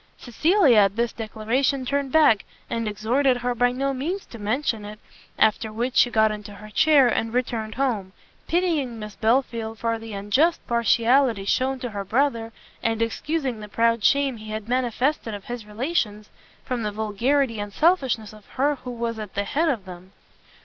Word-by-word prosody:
Cecilia 300 - +3
at 195 -1 +3
this 235 0 0
declaration 235 +5 -1
turned 280 0 -1
back, 295 -9 +5 0.3
and 230 -1 -1
exhorted 245 +6 +1
her 245 0 -1
by 245 +1 +2
no 275 +2 -1
means 335 +10 -3
to 235 - -11
mention 220 +1 -1
it; 210 +1 -8 0.4
after 220 0 +2
which 240 +4 -3
she 245 - +5
got 220 -2 +3
into 210 -1 -7
her 210 +2 -12
chair, 290 0 +5
and 225 0 -1
returned 225 -3 -2
home; 230 -8 -1 0.4
pitying 320 -9 0
Miss 210 -2 -8
Belfield 225 -1 0
for 230 0 -1
the 225 -1 -8
unjust 230 +13 +2
partiality 235 -1 +2
shewn 260 +5 +1
to 245 -3 -4
her 200 -1 -4
brother, 230 +1 0 0.3
and 225 -1 0
excusing 255 +2 -2
the 210 - -8
proud 230 0 +1
shame 275 -1 +3
he 215 0 -10
had 215 0 -5
manifested 250 -1 0
of 200 - -10
his 240 -3 -6
relations, 215 -3 -2 0.3
from 250 -2 -2
the 210 -1 -2
vulgarity 225 +4 0
and 205 0 -4
selfishness 260 - +1
of 210 -1 -16
her 285 +2 0
who 250 - -9
was 235 -2 -3
at 210 -3 -8
the 200 - 0
head 305 +9 0
of 225 -9 -2
them. 185 +1 -11
230 Hz, 175 wpm, -24 LUFS, 215-270 Hz, 0.4 s, back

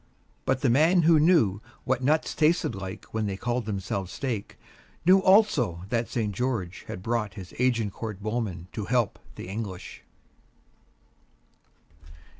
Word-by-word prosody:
But 130 - +1
the 135 - +3
man 165 +7 +4
who 160 -1 +6
knew 150 - +4 0.2
what 130 -1 0
nuts 155 +4 +2
tasted 160 +2 +2
like 95 +1 -7
when 110 -1 -1
they 95 -1 -3
called 120 +1 -2
themselves 95 -2 -3
steak 120 -6 -4 0.5
knew 185 +2 +7
also 185 - +3
that 115 0 -1
St. 110 -4 -1
George 105 -6 -3
had 90 - -7
brought 110 -4 -1
his 95 -4 -9
Agincourt 115 -4 -1
Bowmen 105 -5 -3
to 105 - -4
help 120 -3 0 0.2
the - - -8
English. 100 -2 -6
115 Hz, 135 wpm, -27 LUFS, 100-130 Hz, 0.5 s, knew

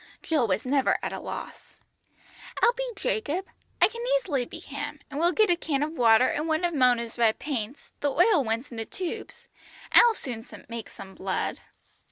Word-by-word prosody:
Jill 300 -8 +1
was 195 +3 0
never 270 +1 +2
at - - -2
a - - -4
loss. - - -8 0.8
"I'll 480 - +6
be - - -3
Jacob. 395 -6 -1 0.3
I - - +7
can 465 +2 -8 0.2
easily 290 - -1
be - - -9
him, 290 +1 -6
and 285 - -4
we'll 340 +2 +4
get 430 0 +3
a - - +4
can 295 -4 -1
of 310 +2 -3
water, 235 -2 +5
and 300 +2 -1
one 315 +2 +1
of 345 - 0
Mona's 245 -4 +2
red 225 -2 +4
paints 270 -2 -5
the 290 - +1
oil 350 +1 +4
ones 230 +3 -2
in 235 - -8
the 225 - -3
tubes 360 - -6 0.4
I'll 470 -2 +7
soon 235 - -6 0.2
make 230 -2 -6
some 190 0 -11
blood." 190 0 -2
285 Hz, 190 wpm, -27 LUFS, 235-345 Hz, 0.8 s, I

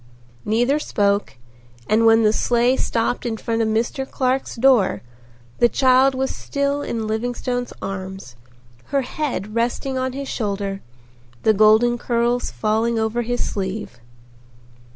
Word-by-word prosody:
Neither 245 +7 +2
spoke 200 - 0 0.5
and 225 +1 +3
when 225 0 +5
the 215 0 +4
sleigh 240 +2 +2
stopped 230 -1 -1
in 230 -3 -3
front 230 +1 -2
of 225 - +1
Mr. 235 +5 -1
Clark's 260 0 -1
door 245 -5 +3 0.6
the 240 - +5
child 260 +1 +4
was 265 0 -2
still 280 0 -2
in 230 -5 -3
Livingstone's 245 +3 -2
arms, 190 -8 -6 0.5
her 275 -1 0
head 250 -6 -4
resting 245 +3 -1
on 260 0 -2
his 275 +1 -5
shoulder, 200 -4 -3 0.6
the 220 - +4
golden 220 +3 +4
curls 240 +1 0
falling 220 - 0
over 220 +2 0
his 245 +1 -2
sleeve. 190 - -5
235 Hz, 130 wpm, -21 LUFS, 215-255 Hz, 0.6 s, when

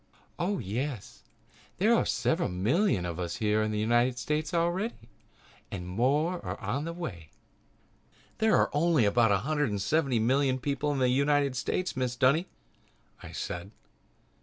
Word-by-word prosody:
"Oh, 195 +4 0
yes, 120 - -4 0.6
there - - +4
are - - +2
several - - 0
million 105 - +1
of 85 0 -4
us 85 -1 -3
here 105 0 +1
in 110 - 0
the 105 - -2
United 120 +3 +2
States 150 +4 -2
already 175 +6 0 0.7
and 90 -3 -6
more 145 - 0
are - - -5
on 130 +10 -2
the 165 - -3
way." 95 - -7 1.1
"There 220 -1 +4
are - - +2
only 150 -4 +3
about 115 +1 +3
a 100 - +4
hundred 150 -2 +1
and 100 -1 -2
seventy 135 +4 +1
million 130 +3 +2
people 140 +2 -1
in 145 - -1
the 130 -1 +3
United 140 +1 +2
States, 185 +7 -2
Mrs. 125 -1 -2
Dunny," 140 +9 +3 0.7
I - - -9
said. 90 +2 -5
130 Hz, 160 wpm, -29 LUFS, 110-155 Hz, 1.1 s, there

